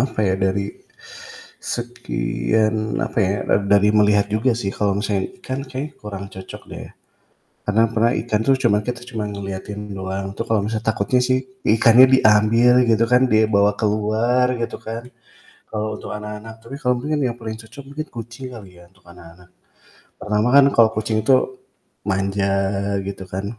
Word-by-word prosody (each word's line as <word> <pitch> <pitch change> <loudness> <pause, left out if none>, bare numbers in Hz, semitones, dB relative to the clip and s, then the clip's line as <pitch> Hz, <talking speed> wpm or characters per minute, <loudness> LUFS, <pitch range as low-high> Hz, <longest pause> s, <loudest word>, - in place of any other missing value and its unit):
Apa 130 -2 -2
ya 95 -1 +2
dari 95 +1 -1 0.9
sekian 110 - -1
apa - - -4
ya 100 0 +1
ad 100 0 +1
dari 100 +1 +4
melihat 105 -1 +3
juga 115 +2 +1
sih 100 -4 -3
kalau 100 -2 0
misalnya 100 -1 -1
ikan 130 -5 -4
kayaknya 135 +3 -5
kurang 100 -2 -6
cocok 95 0 -9
deh. - - -8 0.8
Karena 105 +2 +2
pernah 115 +1 +3
ikan 110 -2 -1
tuh 135 +2 +3
cuma 115 -5 +3
kita 120 +2 -5
cuma 115 -4 -4
ngeliatin 100 +1 -6
doang 95 0 -4
itu 115 - -3
kalau 110 -2 +2 0.2
takutnya 110 +2 +1
sih 130 +1 +2 0.2
ikannya 115 +3 +6
diambil 110 +2 +5 0.2
gitu 115 0 +4
kan, 125 +2 +4
dia 110 0 +4
bawa 100 -1 +2
keluar 110 +4 +1
gitu 115 - -3
kan. 115 +1 -5 0.7
Kalau 110 0 -3
untuk - - -9
anak-anak, 105 +1 -8
tapi 135 +4 -8
kalo 125 -1 +2
mungkin 150 +4 -2
yang 120 -3 -1
paling 110 -2 -5
cocok 115 +5 -12
mungkin 155 +3 -6
kucing 120 +3 -8
kali 95 -7 -12
ya, - - -15
untuk 95 0 -29
anak-anak. 85 0 -15 0.7
Pertama, 105 +2 0
kan 140 -1 +8
kalau 115 -1 +6
kucing 110 0 0
itu 130 +2 +2 0.5
manja 100 0 0 0.6
gitu 100 -1 -6
kan, 95 +2 -5
110 Hz, 160 wpm, -21 LUFS, 100-120 Hz, 0.9 s, kan